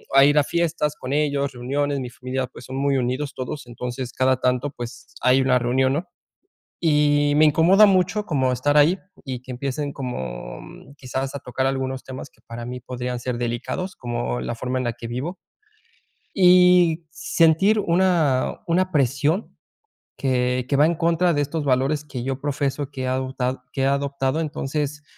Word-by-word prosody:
a 135 - +8
ir 145 +1 +3
a - - +4
fiestas 155 -2 -1
con 130 +2 -4
ellos, 145 -2 0
reuniones. 140 +3 -1
Mi 125 -2 -5
familia 130 +1 -3
pues, 120 - -13
son 130 - -7
muy 140 0 +1
unidos 130 +3 -2
todos, 130 +2 -5
entonces 125 +1 -5
cada 130 -1 +2
tanto 125 +3 +1
pues, 120 -2 -9
hay 130 +1 +4
una 130 -1 +3
reunión, 130 +2 +1
¿no? 165 +6 -2 0.8
Y 145 -1 +3
me 155 - +6
incomoda 175 +7 +6
mucho 195 +2 +2
como 130 -5 +1
estar 145 +4 +1
ahí 160 +6 +5 0.3
y 130 -3 -5
que 130 - -8
empiecen 140 +3 -3
como 65 - -6 0.4
quizás 135 0 -4
a - - -3
tocar 130 +2 -2
algunos 130 -1 -2
temas 130 0 -8
que - - -30
para 115 0 -7
mí 125 +1 -6
podrían 125 0 -4
ser 125 -1 -3
delicados, 120 +10 -3
como 120 0 -3
la 120 - -3
forma 130 +2 -2
en 130 - -2
la 120 - -2
que 120 0 -8
vivo. 135 +10 -4 1.0
Y 180 -3 +5
sentir 165 +5 +3
una 170 -8 +2
una 185 +2 +2
presión 145 - 0 0.6
que 125 -1 0
que 140 - +2
va 145 - +6
en 170 +1 +1
contra 170 +1 +2
de 145 - +1
estos 150 +2 -2
valores 135 +3 +1
que 125 -4 -6
yo 135 0 -3
profeso, 140 -1 -2
que 135 -2 -5
he - - -2
adotad 130 0 -1 0.2
que 135 - -2
he - - +3
adoptado. 140 +1 0
Entonces, 150 -1 -3
135 Hz, 175 wpm, -23 LUFS, 125-150 Hz, 1.0 s, a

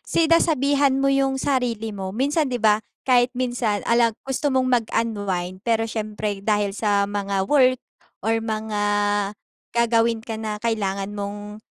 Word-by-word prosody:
sinasabihan 290 -4 +2
mo 275 0 +2
yung 270 -1 +1
sarili 245 -5 -1
mo. 195 -2 -5
Minsan 285 - +1
'di 250 - -1
ba, 215 -2 +3 0.2
kahit 245 -2 +4
minsan 240 -5 -1
alag 235 -1 +2
gusto 270 +2 -1
mong 260 -2 +2 0.2
mag-unwind 200 -5 -2
pero 225 +1 +1
siyempre 215 -2 -3
dahil 205 -1 0
sa 205 -1 +1
mga 200 -1 -2
work 255 +1 +4 0.5
or 225 +1 +1
mga 220 -1 -3 1.0
gagawin 230 -1 +2
ka 225 -2 -5
na 215 -1 -3
kailangan 200 -3 -1
mong, 205 +1 -6
225 Hz, 140 wpm, -23 LUFS, 205-255 Hz, 1.0 s, kahit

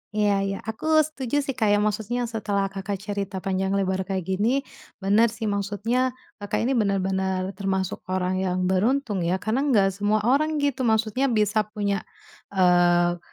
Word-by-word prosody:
Iya 210 -1 +3 0.2
iya. 195 0 -2
Aku 220 +8 -5 0.2
setuju 290 -2 -2
sih 275 - -2
Kak 235 -4 0
ya, 205 0 +4
maksudnya 220 +3 -1
setelah 200 -3 -1
Kakak 195 +1 -4
cerita 200 -1 -4
panjang 190 0 0
lebar 190 -1 -1
kayak 190 -2 -2
gini, 215 +9 0 0.4
bener 210 +4 +4
sih, 225 0 -7
maksudnya 215 +6 -1 0.2
Kakak 205 +1 -2
ini 250 - +1
benar-benar 190 -2 0
termasuk 190 -1 -1
orang 185 0 -1
yang 185 -1 -1
beruntung 215 +2 +1
ya 175 +1 +1
karena 220 +9 -1
enggak 200 -8 +4
semua 205 +2 0
orang 300 +6 +2
gitu 265 -3 0
maksudnya 220 +4 +1
bisa 215 -3 +1
punya, 205 -2 -2 0.5
eee, 175 -1 +4
205 Hz, 160 wpm, -24 LUFS, 190-230 Hz, 0.5 s, ya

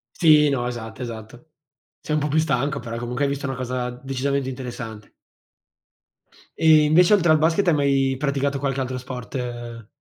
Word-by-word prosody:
Sì, 150 -3 +5
no, 125 -3 -1
esatto, 120 0 -7
esatto. 120 +5 -9 0.5
Sei 150 - -3
un 150 - +1
po' 150 - -1
più 150 - +1
stanco, 140 -2 0
però 115 -1 -6
comunque 120 +3 -2
hai 140 - 0
visto 140 0 -3
una 135 - -4
cosa 125 0 -3
decisamente 135 +2 -3
interessante. 120 -5 -7 1.5
E 155 -1 +6
invece 170 +6 +5
oltre 175 -5 +3
al 155 - +4
basket 165 +5 +2
hai 170 - +5
mai 135 -2 +2
praticato 140 0 -1
qualche 135 -1 -2
altro 130 0 -3
sport 120 -2 -6
135 Hz, 170 wpm, -23 LUFS, 125-150 Hz, 1.5 s, E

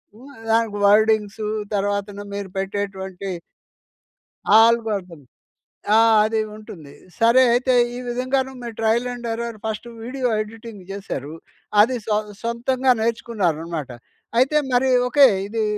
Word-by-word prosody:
హ్మ్. 270 +5 -14 0.2
దానికి 225 -2 +1
వర్డింగ్స్ 215 0 +3 0.3
తర్వాతన 205 0 -2
మీరు 200 -2 -5
పెట్టేటువంటి 195 -1 -4 1.3
ఆల్గరిథమ్. 205 - 0 0.7
ఆ! - - +6 0.3
అది 220 0 0 0.2
ఉంటుంది. 165 -9 -12 0.3
సరే 235 +3 +5
అయితే, 250 +1 +2 0.2
ఈ - - -5
విధంగాను 255 +2 -1
మీ 240 - -5
ట్రయలండెర్రర్ 235 0 -1
ఫస్ట్ 220 +1 -4 0.2
వీడియో 255 +2 -3
ఎడిటింగ్ 220 -2 -8
జేసారు. 160 -7 -6 0.5
అది 245 +4 +4
సొ 210 -1 +1 0.3
సొంతంగా 250 +3 +1
నేర్చుకున్నారనమాట. 170 - -2 0.5
అయితే 275 +4 +3 0.2
మరి 260 +1 +3 0.2
ఓకే, 280 +1 +7 0.2
ఇదీ 220 +1 -2
220 Hz, 105 wpm, -21 LUFS, 200-240 Hz, 1.3 s, ఓకే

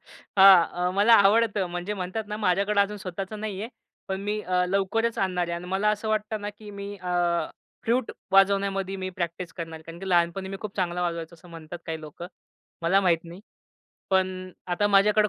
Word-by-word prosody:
हां, 190 -3 +5 0.2
अ, - - +1
मला 210 +4 +5
आवडतं. 205 -1 +4
म्हणजे 175 +4 -3
म्हणतात 190 +3 -4
ना, 210 - -3
माझ्याकडे 200 0 +2
अजून 205 +1 +1
स्वतःच 190 0 -6
नाहीये. 215 0 -4 0.4
पण 190 0 -2
मी 210 +1 -2
अ, 180 -1 +1
लवकरच 200 +4 0
आणणार 180 -2 0
आहे. - - -3
आणि 175 +1 -7
मला 195 +3 +1
असं 215 +1 -2
वाटतं 215 0 -1
ना, 205 0 -4
की 210 0 -12
मी 200 0 -7
अ, 180 -1 -6 0.7
फ्लूट 240 +2 +1 0.2
वाजवण्यामध्ये 195 0 +3
मी 185 -1 -4
प्रॅक्टिस 170 0 -3
करणार 165 -2 -6
आहे. - - -16
कारण, 165 +1 -10
की 195 - -5
लहानपणी 175 +2 +1
मी 195 - -5
खूप 210 -2 -7
चांगलं 180 -2 -1
वाजवायचो, 170 -1 -3
असं 170 +1 -17
म्हणतात 165 +1 -9
काही 160 -1 -4
लोकं. 155 +3 -9 0.6
मला 185 +4 +4
माहित 175 -4 +3
नाही. 170 +3 -10 0.7
पण 185 -1 0 0.2
आता 180 +3 +1
माझ्याकडे 210 +1 +4
195 Hz, 190 wpm, -26 LUFS, 175-205 Hz, 0.7 s, हां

